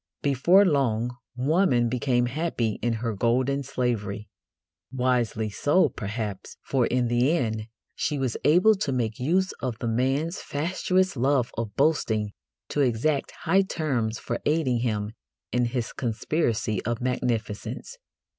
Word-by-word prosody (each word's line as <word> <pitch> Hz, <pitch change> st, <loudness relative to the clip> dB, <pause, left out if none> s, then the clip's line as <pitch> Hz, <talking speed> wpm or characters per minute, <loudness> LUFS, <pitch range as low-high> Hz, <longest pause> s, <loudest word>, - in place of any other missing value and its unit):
Before 170 Hz, +9 st, +5 dB
long 125 Hz, -, +1 dB, 0.2 s
woman 130 Hz, -2 st, +2 dB
became 125 Hz, 0 st, +1 dB
happy 125 Hz, -5 st, -1 dB
in 120 Hz, -1 st, +1 dB
her 115 Hz, -, 0 dB
golden 125 Hz, +6 st, +1 dB
slavery. 110 Hz, -6 st, -2 dB, 0.6 s
Wisely 125 Hz, -4 st, 0 dB
so, 145 Hz, -, +3 dB
perhaps, 105 Hz, -2 st, -5 dB
for 130 Hz, -4 st, +1 dB
in 125 Hz, -1 st, +1 dB
the 125 Hz, +8 st, +2 dB
end 110 Hz, -5 st, -2 dB, 0.3 s
she 145 Hz, -, -1 dB
was 130 Hz, -4 st, -1 dB
able 180 Hz, +9 st, +6 dB
to 190 Hz, -8 st, -2 dB
make 115 Hz, -4 st, -1 dB
use 185 Hz, +8 st, +1 dB
of 125 Hz, -4 st, -3 dB
the 120 Hz, -, -3 dB
man's 135 Hz, -, 0 dB
fatuous 185 Hz, +4 st, 0 dB
love 130 Hz, -1 st, +1 dB
of 110 Hz, -3 st, -4 dB
boasting 110 Hz, -9 st, +1 dB, 0.4 s
to 145 Hz, -, 0 dB
exact 135 Hz, +3 st, +1 dB
high 190 Hz, +4 st, +4 dB
terms 130 Hz, -, -1 dB
for -, -, -4 dB
aiding 145 Hz, -6 st, +1 dB
him 105 Hz, -3 st, -1 dB, 0.4 s
in 125 Hz, 0 st, +2 dB
his 120 Hz, -1 st, -3 dB
conspiracy 115 Hz, -, -1 dB
of 115 Hz, +1 st, -2 dB
magnificence. 120 Hz, -, -3 dB
125 Hz, 135 wpm, -26 LUFS, 115-145 Hz, 0.6 s, able